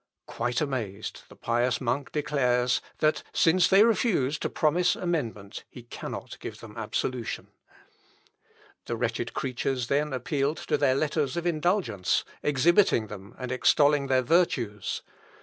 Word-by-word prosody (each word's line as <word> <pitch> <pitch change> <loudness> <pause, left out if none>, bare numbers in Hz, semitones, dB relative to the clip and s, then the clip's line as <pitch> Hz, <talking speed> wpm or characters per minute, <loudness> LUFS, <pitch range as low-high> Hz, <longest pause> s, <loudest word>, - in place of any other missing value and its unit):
Quite 120 +1 -2
amazed, 115 -8 -4
the - - -14
pious 120 +2 0
monk 130 +2 -2
declares, 125 -5 +1 0.2
that 155 0 +2
since 180 +2 +4
they 195 +2 +6
refuse 205 - +2
to - - -2
promise 175 +3 +2
amendment, 115 - -3
he 125 - -11
cannot 120 - -7
give - - -7
them - - -11
absolution. 125 -3 -3 1.4
The - - -2
wretched - - -2
creatures 130 -1 -2
then 150 +2 +1
appealed 140 +3 -1
to - - -1
their 130 -3 +3
letters 145 0 0
of 170 - -2
indulgence, 165 - +1 0.2
exhibiting 150 - +3
them 100 +2 -10
and 125 -1 -5
extolling 145 +2 +3
their 130 -1 +2
virtues. 120 - 0
135 Hz, 130 wpm, -27 LUFS, 120-155 Hz, 1.4 s, they